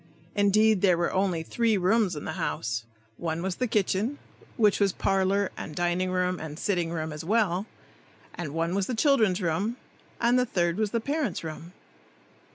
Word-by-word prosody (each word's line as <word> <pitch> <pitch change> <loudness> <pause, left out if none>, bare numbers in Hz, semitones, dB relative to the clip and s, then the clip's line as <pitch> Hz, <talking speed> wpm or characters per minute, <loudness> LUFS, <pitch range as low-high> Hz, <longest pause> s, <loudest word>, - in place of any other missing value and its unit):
Indeed, 205 0 +4
there 185 -4 +4
were 170 - 0
only 185 -4 +1
three 225 +4 +1
rooms 190 0 +2
in 150 - -6
the - - -3
house. 115 0 -2 0.3
One 165 0 -3
was 190 -1 -2
the 250 - 0
kitchen, 215 +4 0 0.4
which 210 -3 +4
was 200 -1 +3
parlor 195 +1 +1
and 150 - -7
dining 175 +1 0
room 180 0 0
and 155 -1 -7
sitting 175 -3 0
room 160 -2 -3
as 150 - -6
well, 200 0 +1 0.7
and 170 -5 -5
one 165 +3 -1
was 195 -1 0
the 250 - -2
children's 220 - +3
room, 195 +9 -1 0.4
and 240 +2 +3
the 250 - +2
third 175 -3 0
was 215 -1 +1
the 230 +2 -1
parents' 280 - -2
room. 165 +2 -7
190 Hz, 175 wpm, -27 LUFS, 170-215 Hz, 0.7 s, Indeed